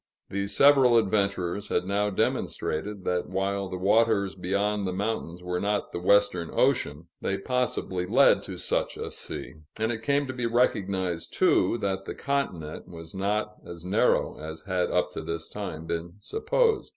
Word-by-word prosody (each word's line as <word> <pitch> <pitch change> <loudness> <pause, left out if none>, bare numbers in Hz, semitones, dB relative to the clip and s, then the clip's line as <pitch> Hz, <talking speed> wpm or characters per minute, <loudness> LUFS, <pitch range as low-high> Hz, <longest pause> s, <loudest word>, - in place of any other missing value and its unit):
These 100 +1 0
several 135 -4 +7
adventurers 100 -2 0
had - - 0
now 100 +2 +1
demonstrated 95 0 -1
that 90 -1 -1
while 95 +1 -1
the 95 - -4
waters 100 +1 +3
beyond 100 +2 -1
the - - -1
mountains 90 -3 -3
were 90 0 -2
not 105 +1 -1
the - - -4
Western 90 -2 +3
Ocean, 75 +3 +1 0.2
they 95 - -1
possibly 95 -5 -1
led - - +5
to - - -7
such - - -1
a - - -5
sea; - - -4 0.2
and 110 +1 0
it 115 -1 -4
came 140 +4 +1
to 130 - -5
be 125 -2 -1
recognized, 95 -7 0
too, 95 +6 +3
that 95 -1 -1
the - - -5
continent 95 - -3
was 80 -2 -10
not 105 +2 -1
as 85 0 -9
narrow 105 +7 +2
as 80 +1 -7
had 90 -2 0
up - - +1
to - - -5
this 85 -1 -4
time 80 -6 -6
been 85 +1 -3
supposed. 455 - +1
100 Hz, 165 wpm, -27 LUFS, 90-110 Hz, 0.2 s, several